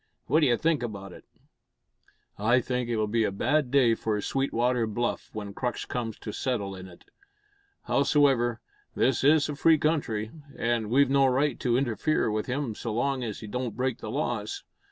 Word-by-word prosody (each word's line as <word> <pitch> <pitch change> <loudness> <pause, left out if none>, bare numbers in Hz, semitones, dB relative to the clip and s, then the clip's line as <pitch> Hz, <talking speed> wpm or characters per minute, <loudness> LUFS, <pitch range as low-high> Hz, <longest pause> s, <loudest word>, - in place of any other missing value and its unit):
What 155 - +3
d'you 130 -7 +3
think 160 -3 +1
about 100 -5 -6
it?" - - -14 1.1
"I 120 +5 +3
think 125 -1 -2
it'll 110 -2 +1
be 110 +2 +1
a 105 - 0
bad 135 +7 +1
day 125 -3 +4
for 110 -1 -1
Sweetwater 125 -1 0
Bluff 120 +3 -2
when 105 -2 -6
Crux 120 +3 -3
comes 115 -3 -4
to 105 - -5
settle 105 -6 -2
in 95 0 -9
it. 85 -2 -16 0.8
Howsoever, 135 -5 +2 0.3
this 130 -1 +2
is 145 +1 +5
a 150 - -4
free 160 +2 +4
country, 135 -9 -1 0.3
an' 115 -2 0
we've 135 +2 +4
no 135 -1 +5
right 135 +1 +1
to 120 -1 +1
interfere 125 0 0
with 105 0 -2
him 130 -2 -2
so 115 +2 -5
long 130 +3 0
as 110 -4 -5
he 110 - -7
don't 120 0 -4
break 130 -1 -1
the 110 - -6
laws. 120 -4 -3
120 Hz, 175 wpm, -27 LUFS, 110-135 Hz, 1.1 s, is